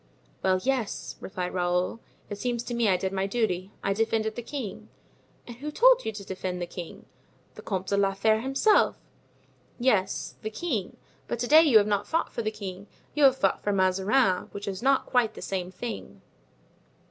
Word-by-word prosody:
"Well, 185 0 +2
yes," 260 -5 -2
replied 180 -1 -4
Raoul. 180 +3 0 0.3
"It 205 - -6
seems 240 0 -1
to 240 - -5
me 235 -3 +2
I 185 - +3
did 190 +1 -3
my 195 0 0
duty. 195 -4 -1
I 195 - +1
defended 220 +1 0
the 240 - -5
king." 240 -4 -6 0.6
"And 240 -1 -10
who 290 +4 -5
told - - +5
you - - -1
to 200 -1 -8
defend 185 -1 -4
the 175 - -2
king?" 175 -1 -9 0.5
"The - - -11
Comte 190 -2 -3
de 200 - +1
la 195 -1 +2
Fere 220 +2 +2
himself." 270 - +3 0.8
"Yes, 215 -7 0
the 215 - -3
king; 220 - -3 0.3
but - - -2
to 245 +1 -2
day 310 +4 +8
you 285 -9 +6
have 205 - +5
not 205 -1 0
fought 330 - -1
for - - -2
the 215 - -1
king, 200 -2 -8 0.3
you 295 -1 +4
have 265 -1 +5
fought 195 - +1
for 205 - 0
Mazarin; 190 +2 +2
which 200 +1 -6
is 195 0 -4
not 270 +1 +3
quite 235 -4 +1
the - - -9
same 185 -2 -3
thing." 230 +4 -7
210 Hz, 195 wpm, -27 LUFS, 190-245 Hz, 0.8 s, day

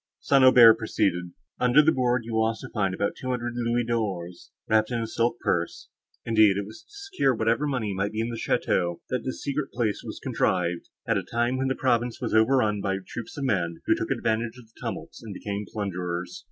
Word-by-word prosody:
St. 135 -2 +3
Aubert 120 -3 +8
proceeded. 90 -5 0 0.3
"Under 125 +5 +5
that 160 - +5
board 125 -3 +1
you 115 - -6
will 110 0 +3
also 115 +3 -4
find 95 -4 0
about 100 +1 0
two 130 - -6
hundred 120 -1 -2
louis 120 0 0
d'ors, 100 -7 -3 0.2
wrapped 110 0 +3
in 120 -2 -1
a 115 - -2
silk 115 +1 -1
purse; 85 -1 -2 0.4
indeed, 110 -4 +4
it 100 - -2
was 110 +2 -11
to - - -31
secure 395 - -1
whatever 115 +6 +1
money 120 -8 -1
might 100 +2 -1
be 110 - -4
in 115 +1 -1
the 120 - -4
château, 85 -5 0
that 125 -2 -1
this 130 - -5
secret 140 0 -2
place 115 -4 -1
was - - -7
contrived, 90 -1 -1 0.2
at - - +2
a - - -6
time 120 +2 +1
when 130 0 0
the 130 - 0
province 120 -2 0
was - - -3
over 110 +5 +4
run 105 -4 +1
by 95 0 -1
troops 120 - -8
of 140 - -3
men, 85 -9 0
who - - +4
took - - -3
advantage 115 +1 -1
of 125 - -13
the - - -21
tumults, - - -6
and 110 -4 -8
became 100 +1 -5
plunderers. 90 - -4
115 Hz, 220 wpm, -26 LUFS, 100-125 Hz, 0.4 s, Aubert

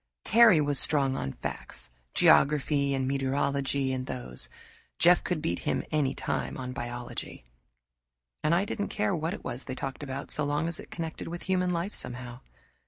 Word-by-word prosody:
Terry 225 -5 +7
was 145 -2 +4
strong 135 -3 +3
on 70 - -3
facts 60 -2 -5 0.2
geography 140 -1 +4
and 130 -1 -1
meteorology 135 0 0
and 130 0 -3
those; 60 -1 -4 0.5
Jeff 175 +1 +5
could 175 -4 -2
beat 85 - -1
him - - -1
any 145 -3 +1
time - - -2
on 125 -1 -5
biology, 120 - -6 1.0
and 155 +2 +3
I 190 +3 +2
didn't 205 0 -3
care 205 -3 0
what 165 +4 -2
it - - -12
was 125 - -4
they 130 - -4
talked 135 +1 -4
about, 140 -1 -5
so 150 - 0
long 145 +3 0
as 170 - -1
it - - -10
connected 165 -1 -5
with 175 +1 -6
human 185 -1 +1
life, 180 +3 -1
somehow. 125 0 -4
140 Hz, 170 wpm, -29 LUFS, 130-165 Hz, 1.0 s, Terry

